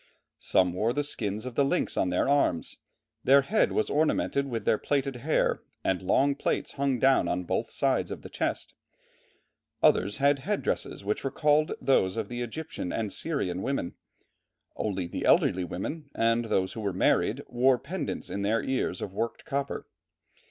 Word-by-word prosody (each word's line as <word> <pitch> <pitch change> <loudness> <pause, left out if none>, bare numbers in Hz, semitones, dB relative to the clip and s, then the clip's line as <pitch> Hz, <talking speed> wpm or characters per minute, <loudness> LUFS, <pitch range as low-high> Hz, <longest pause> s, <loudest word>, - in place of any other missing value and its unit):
"Some 90 -2 +2
wore 110 +6 0
the 145 - 0
skins 110 -6 -3
of 130 - -5
the 140 - +3
lynx 175 +6 0
on 90 - +1
their 90 - +1
arms; 140 -12 +1 0.5
their 140 +1 +6
head 215 +10 +2
was 215 - +1
ornamented 145 -2 +1
with 115 -4 -4
their 110 - +3
plaited 135 -2 -1
hair 120 - +1 0.2
and 95 -1 0
long 135 +9 +3
plaits 140 - -2
hung 140 -2 0
down 135 +2 +4
on 90 +1 -1
both - - -2
sides - - 0
of - - -7
the - - -7
chest; - - -2 1.1
others 100 +3 +4
had 140 0 +3
headdresses 195 - -2
which 105 - -1
recalled 150 +3 +2
those 95 -7 +2
of - - -3
the 120 0 -4
Egyptian 120 - -5
and 110 -3 -2
Syrian 95 - -1
women; 135 -9 -2 0.8
only 95 -4 -2
the 85 - -5
elderly 90 - +4
women, 140 - -5
and 115 +1 +2
those 95 -4 0
who 110 - -6
were 100 -3 -1
married, 90 - +2
wore 125 +1 +3
pendants 165 +1 -5
in 100 - -3
their 110 +3 +1
ears 130 -8 -1
of 95 - -6
worked 115 +3 -3
copper." 140 0 -3
120 Hz, 170 wpm, -28 LUFS, 100-140 Hz, 1.1 s, their